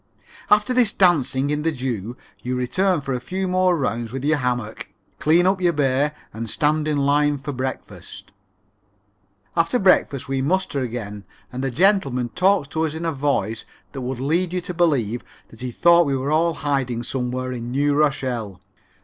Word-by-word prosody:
After 210 +5 +4
this 245 -4 +4
dancing 145 -6 +2
in 150 0 -1
the 165 +1 0
dew 125 -5 -4 0.2
you 125 +3 -3
return 175 +7 +1
for 135 -1 -3
a 125 - -1
few 190 +9 -3
more 185 -1 +2
rounds 120 -5 -2
with 135 +1 -5
your 155 0 +2
hammock, 120 -4 -3 0.3
clean 165 +3 +4
up 190 0 +2
your 175 -1 +3
bay 140 0 +1 0.2
and 115 +1 -5
stand 155 +4 +1
in 150 -1 0
line 145 +1 +2
for 140 +2 -6
breakfast. 130 0 -6 1.2
After 165 +7 +2
breakfast 185 - +2
we 135 0 -1
muster 170 0 0
again 110 -5 -5 0.3
and 130 +1 -4
a 135 - 0
gentleman 140 - +2
talks 185 - +2
to 160 +1 -1
us 155 - -6
in 165 +1 -4
a 165 - 0
voice 135 -7 -1 0.3
that 135 - -6
would 125 0 -4
lead 170 +6 0
you 180 - -1
to 180 - -6
believe 135 - +1 0.3
that 115 - -14
he 125 - -3
thought 170 +5 +5
we 135 -1 0
were 135 +3 -2
all 165 +2 +3
in 165 - -4
hiding 135 -5 -1
somewhere 130 0 -3
in 120 -1 -5
New 145 +3 +1
Rochelle. 130 -9 -1
140 Hz, 185 wpm, -22 LUFS, 125-165 Hz, 1.2 s, thought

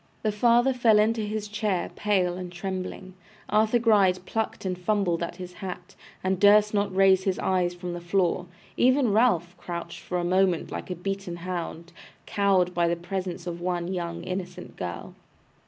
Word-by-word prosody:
The 215 - +2
father 240 +4 +3
fell 235 -4 +4
into 220 +2 +2
his 210 0 -3
chair 210 -3 -1
pale 185 -4 +1
and 180 -1 -6
trembling; 185 +1 -5 0.4
Arthur 215 +3 +3
Gride 200 -6 +3
plucked 220 -1 -3
and 185 -1 -1
fumbled 180 -2 0
at 170 - -3
his 180 -1 -8
hat, 180 -1 -7 0.3
and 185 0 0
durst 210 +1 +6
not 200 -2 0
raise 190 -1 +5
his 190 -2 +1
eyes 180 -2 0
from 175 0 -5
the 175 - -6
floor; 180 0 0 0.3
even 255 -3 +3
Ralph 180 -7 +2
crouched 170 -1 -6
for 180 - -4
the 175 - -1
moment 185 -1 +1
like - - -6
a 180 - -3
beaten 195 0 -4
hound, 170 -1 -5 0.3
cowed 195 -4 +2
by 170 -1 +2
the 170 - +1
presence 180 0 -5
of 175 -1 -5
one 175 0 -2
young 170 -1 -4
innocent 180 0 -6
girl! 85 -2 -6
185 Hz, 170 wpm, -26 LUFS, 175-205 Hz, 0.4 s, durst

